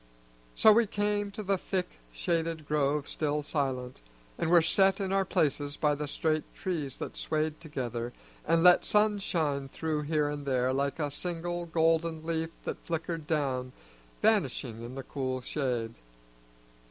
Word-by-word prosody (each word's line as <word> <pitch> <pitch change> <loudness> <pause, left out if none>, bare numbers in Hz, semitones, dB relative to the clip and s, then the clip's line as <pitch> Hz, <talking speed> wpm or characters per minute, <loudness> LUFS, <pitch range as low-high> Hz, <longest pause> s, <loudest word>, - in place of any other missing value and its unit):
So 220 - +7
we 230 0 +4
came 205 0 0
to 205 +2 -6
the 195 -1 +1
thick 180 -1 -3
shaded 165 -3 -1
grove 150 -1 +1
still 150 -1 -1
silent, 130 - -2 0.3
and - - -1
were 170 -1 +7
set 195 +3 +3
in 195 -1 -1
our 195 0 +2
places 145 -2 0
by 150 -1 +2
the 145 0 -3
straight 155 +1 0
trees 155 -8 -3
that - - -6
swayed 155 0 -1
together 120 -6 -4 0.3
and 165 +1 +3
let 180 -1 +7
sunshine 175 -10 +1
through 155 +1 -2
here 150 0 +1
and 145 0 -4
there 130 -2 +1
like 140 +2 0
a 150 -3 -1
single 175 +2 -3
golden 165 0 +1
leaf 165 0 -1
that - - -5
flickered 165 -1 -3
down, 130 -5 -1 0.5
vanishing 110 - +1
in 120 +2 -7
the 135 - -5
cool 130 -1 -3
shade. 125 -5 -2
155 Hz, 155 wpm, -30 LUFS, 140-170 Hz, 0.5 s, So